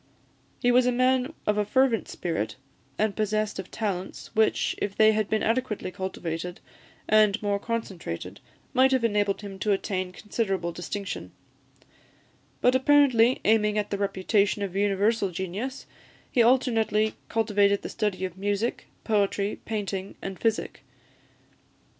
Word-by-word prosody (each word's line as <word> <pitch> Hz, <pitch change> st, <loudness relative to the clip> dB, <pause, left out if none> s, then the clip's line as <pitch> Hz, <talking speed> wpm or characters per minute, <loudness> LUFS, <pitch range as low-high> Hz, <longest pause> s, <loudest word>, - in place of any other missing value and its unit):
He 245 Hz, -, +3 dB
was 250 Hz, 0 st, +4 dB
a -, -, +3 dB
man 255 Hz, +2 st, +2 dB
of 210 Hz, 0 st, +1 dB
a -, -, +3 dB
fervent 245 Hz, +2 st, +2 dB
spirit, 165 Hz, -11 st, -3 dB, 0.4 s
and 215 Hz, -1 st, 0 dB
possessed 215 Hz, -1 st, -1 dB
of 190 Hz, -, -6 dB
talents, 195 Hz, -4 st, -4 dB
which, 220 Hz, 0 st, +2 dB
if 200 Hz, -1 st, -2 dB
they 220 Hz, 0 st, +6 dB
had 215 Hz, -1 st, 0 dB
been 220 Hz, -, +1 dB
adequately 225 Hz, -5 st, -1 dB
cultivated, 180 Hz, -2 st, -5 dB, 0.5 s
and 215 Hz, 0 st, +4 dB
more 200 Hz, -1 st, 0 dB
concentrated, 200 Hz, -, -5 dB, 0.3 s
might 260 Hz, +1 st, +5 dB
have 260 Hz, -2 st, +2 dB
enabled 205 Hz, -3 st, +1 dB
him 195 Hz, -2 st, -8 dB
to 210 Hz, -, 0 dB
attain 185 Hz, -1 st, -2 dB
considerable 195 Hz, -3 st, -2 dB
distinction; 195 Hz, +3 st, -5 dB, 1.3 s
but, 250 Hz, -, +4 dB
apparently 260 Hz, -3 st, +4 dB
aiming 210 Hz, -1 st, +3 dB
at 210 Hz, -1 st, -1 dB
the 200 Hz, -, 0 dB
reputation 200 Hz, +1 st, +1 dB
of 190 Hz, -2 st, -4 dB
universal 205 Hz, +1 st, +2 dB
genius, 190 Hz, +9 st, -5 dB, 0.5 s
he 245 Hz, -, +3 dB
alternately 225 Hz, -3 st, +3 dB, 0.2 s
cultivated 205 Hz, -3 st, +2 dB
the -, -, -3 dB
study 195 Hz, -3 st, -1 dB
of 185 Hz, 0 st, -7 dB
music, 205 Hz, +3 st, -1 dB, 0.2 s
poetry, 205 Hz, -1 st, 0 dB
painting, 200 Hz, -3 st, -4 dB
and 195 Hz, -1 st, -6 dB
physic. 225 Hz, -1 st, -1 dB
210 Hz, 135 wpm, -26 LUFS, 195-225 Hz, 1.3 s, they